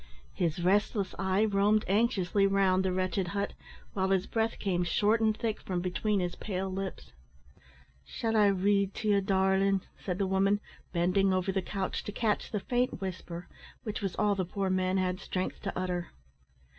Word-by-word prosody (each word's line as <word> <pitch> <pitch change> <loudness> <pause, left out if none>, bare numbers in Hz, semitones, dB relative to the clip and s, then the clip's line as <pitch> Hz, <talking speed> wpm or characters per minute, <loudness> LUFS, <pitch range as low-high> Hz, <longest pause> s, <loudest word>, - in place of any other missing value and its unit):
His 170 -1 -1
restless 200 +1 +2
eye 190 +2 +2
roamed 210 +1 +3
anxiously 200 -2 +2
round 195 -1 +3
the 190 - +1
wretched 185 0 0
hut, 200 +3 -2 0.4
while 190 -1 0
his 190 -1 +2
breath 225 0 -1
came 180 -3 0
short 210 +6 +2
and 215 -1 +2
thick 225 -2 -2
from 180 -2 -2
between 195 +3 0
his 175 -1 -2
pale 190 -2 -3
lips. 190 0 -5 0.9
"Shall 225 - -2
I 210 -1 +6
read 200 0 +2
to 215 - -2
ye, 200 -1 +4
darlin'?" 190 0 +2 0.2
said 180 -2 -2
the 200 - +1
woman, 195 +2 +2 0.3
bending 185 +3 +2
over 185 +1 +1
the 190 0 0
couch 190 0 -3
to - - -4
catch 210 0 0
the 210 - -1
faint 245 +2 0
whisper, 180 -2 -6 0.4
which 215 0 -4
was 195 -3 -2
all 210 -1 +2
the 195 -1 -1
poor 190 +1 -2
man 185 0 +1
had 185 0 0
strength 185 0 -3
to 195 - -4
utter. 180 -2 -2
195 Hz, 175 wpm, -30 LUFS, 185-205 Hz, 0.9 s, I